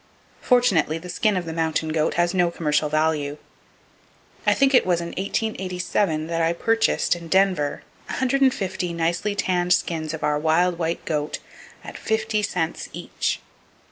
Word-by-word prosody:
Fortunately, 195 Hz, -, +3 dB
the 180 Hz, +2 st, -9 dB
skin 210 Hz, +2 st, +1 dB
of 180 Hz, -, -2 dB
the 165 Hz, -, -5 dB
mountain 160 Hz, -1 st, -1 dB
goat 155 Hz, 0 st, 0 dB
has 175 Hz, +1 st, +2 dB
no 180 Hz, -2 st, +3 dB
commercial 150 Hz, -3 st, 0 dB
value. 155 Hz, -1 st, 0 dB, 1.1 s
I -, -, +5 dB
think 275 Hz, 0 st, +3 dB
it 250 Hz, -, +6 dB
was 175 Hz, -2 st, +1 dB
in 170 Hz, 0 st, -4 dB
1887 185 Hz, -4 st, -1 dB
that 165 Hz, 0 st, -2 dB
I 165 Hz, +1 st, +2 dB
purchased, 225 Hz, +1 st, +1 dB
in 170 Hz, -1 st, -9 dB
Denver, 185 Hz, -5 st, +1 dB, 0.2 s
150 255 Hz, -9 st, 0 dB
nicely 170 Hz, +5 st, -1 dB
tanned 180 Hz, -2 st, +2 dB
skins 160 Hz, -3 st, -1 dB
of 160 Hz, -, -8 dB
our 150 Hz, 0 st, +1 dB
wild 170 Hz, +3 st, +2 dB
white 165 Hz, 0 st, -2 dB
goat 150 Hz, -1 st, -2 dB, 0.5 s
at -, -, -9 dB
fifty 220 Hz, -1 st, 0 dB
cents 180 Hz, -5 st, -2 dB
each! -, -, -3 dB
175 Hz, 150 wpm, -23 LUFS, 160-195 Hz, 1.1 s, it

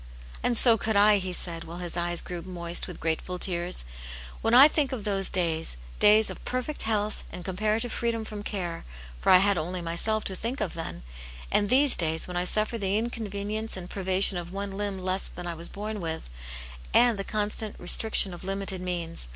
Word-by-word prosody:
"And 240 Hz, -2 st, +3 dB
so 230 Hz, -2 st, +7 dB
could 220 Hz, +1 st, -1 dB
I!" 205 Hz, +1 st, +6 dB
he 185 Hz, -1 st, -4 dB
said, 170 Hz, -2 st, -6 dB
while 170 Hz, +2 st, -9 dB
his 175 Hz, -2 st, -6 dB
eyes 175 Hz, -1 st, -1 dB
grew 175 Hz, -2 st, -6 dB
moist 170 Hz, -1 st, -3 dB
with 180 Hz, -, -9 dB
grateful 165 Hz, +3 st, -2 dB
tears. 175 Hz, -, 0 dB, 0.3 s
" 60 Hz, 0 st, -12 dB
When 225 Hz, +1 st, +3 dB
I 270 Hz, +4 st, +10 dB
think 300 Hz, -3 st, 0 dB
of 250 Hz, -6 st, -4 dB
those 195 Hz, -2 st, +1 dB
days, 165 Hz, -, -1 dB, 0.2 s
days 215 Hz, +1 st, +5 dB
of -, -, -10 dB
perfect 255 Hz, +4 st, -3 dB
health 215 Hz, -1 st, 0 dB
and 175 Hz, -, -8 dB
comparative 215 Hz, +5 st, -1 dB
free? 235 Hz, -, -1 dB
dom 230 Hz, -1 st, -3 dB
from 210 Hz, -1 st, -7 dB
care, 180 Hz, -5 st, -4 dB, 0.4 s
for -, -, 0 dB
I 185 Hz, -, +10 dB
had 195 Hz, -1 st, +3 dB
only 180 Hz, +3 st, -4 dB
myself 175 Hz, +6 st, -1 dB
to 190 Hz, -, -3 dB
think 235 Hz, +8 st, -4 dB
of 210 Hz, -5 st, -2 dB
then, 165 Hz, -, -6 dB, 0.5 s
and 205 Hz, -1 st, +2 dB
these 270 Hz, +2 st, +5 dB
days 160 Hz, -1 st, 0 dB
when 180 Hz, -, -6 dB
I 175 Hz, 0 st, 0 dB
suffer 215 Hz, +4 st, 0 dB
the 195 Hz, 0 st, +1 dB
inconvenience 215 Hz, -2 st, -3 dB
"and 180 Hz, -1 st, -8 dB
privation 190 Hz, -1 st, +2 dB
of 175 Hz, 0 st, -8 dB
one 200 Hz, +1 st, -4 dB
limb 200 Hz, -1 st, -2 dB
less, 185 Hz, +1 st, -2 dB
than 180 Hz, -, -9 dB
I 175 Hz, -, -3 dB
was 170 Hz, +1 st, -4 dB
born 210 Hz, 0 st, -5 dB
with| 160 Hz, -, -4 dB, 0.6 s
and 240 Hz, -4 st, +5 dB
the -, -, -2 dB
constant 210 Hz, +1 st, -1 dB
restriction 195 Hz, +1 st, +3 dB
of 175 Hz, -, -9 dB
limited 195 Hz, -1 st, -3 dB
means. 170 Hz, -, -2 dB
195 Hz, 205 wpm, -27 LUFS, 175-215 Hz, 0.6 s, I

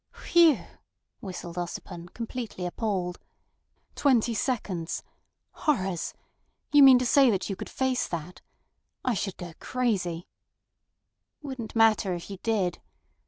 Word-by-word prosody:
"Phew!" 335 Hz, -4 st, +5 dB, 0.6 s
whistled 180 Hz, -4 st, -7 dB
Ossipon, 175 Hz, 0 st, -6 dB
completely 230 Hz, -5 st, -5 dB
appalled. 180 Hz, -2 st, -2 dB, 0.7 s
"Twenty 245 Hz, -4 st, +3 dB
seconds! 200 Hz, -7 st, -2 dB, 0.5 s
Horrors! 190 Hz, -, -1 dB, 0.6 s
You 290 Hz, -1 st, +7 dB
mean 265 Hz, -2 st, +10 dB
to 250 Hz, -, 0 dB
say 270 Hz, +1 st, +5 dB
that 200 Hz, -1 st, 0 dB
you -, -, -2 dB
could -, -, -7 dB
face 260 Hz, -1 st, 0 dB
that? 170 Hz, +1 st, -6 dB, 0.6 s
I 250 Hz, -, +2 dB
should 195 Hz, -2 st, -3 dB
go 175 Hz, -3 st, -8 dB
crazy—" 190 Hz, -9 st, -1 dB, 1.2 s
"Wouldn't 260 Hz, -6 st, -6 dB
matter 220 Hz, -4 st, +4 dB
if 175 Hz, +3 st, -8 dB
you 195 Hz, -, -7 dB
did. 200 Hz, -6 st, 0 dB
210 Hz, 120 wpm, -27 LUFS, 180-250 Hz, 1.2 s, mean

